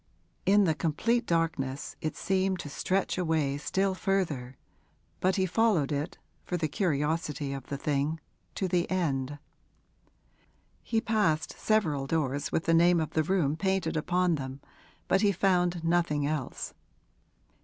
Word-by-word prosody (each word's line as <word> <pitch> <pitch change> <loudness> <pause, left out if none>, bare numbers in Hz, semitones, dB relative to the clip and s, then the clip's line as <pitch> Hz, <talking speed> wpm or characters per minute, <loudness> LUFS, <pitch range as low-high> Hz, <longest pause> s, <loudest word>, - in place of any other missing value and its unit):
In 205 +1 +6
the 165 -4 +3
complete 195 - 0
darkness 160 -5 -1
it 155 - -2
seemed 190 0 +1
to 145 - -7
stretch 185 +6 -1
away 155 -5 0
still 190 +5 0
further, 165 - -1 0.6
but 185 +1 +2
he 190 -2 +2
followed 185 -6 +2
it, 145 +3 -2 0.3
for 180 - -2
the 160 -2 0
curiosity 150 -3 -1
of 135 -2 -7
the 140 - -3
thing, 145 +2 -1 0.4
to 190 - -1
the 175 -1 0
end. 145 -6 -1 1.4
He 225 -1 0
passed 210 -9 +1
several 155 -11 +1
doors 145 -3 -1
with 165 - 0
the 165 - +3
name 170 +1 +5
of 160 - -2
the 160 - +2
room 155 -3 +1
painted 190 -2 0
upon 180 +3 +1
them, 135 -2 -4 0.5
but 195 - +3
he 205 -2 +4
found 180 -2 +1
nothing 165 -4 +1
else. 145 -3 -3
165 Hz, 145 wpm, -29 LUFS, 145-185 Hz, 1.4 s, In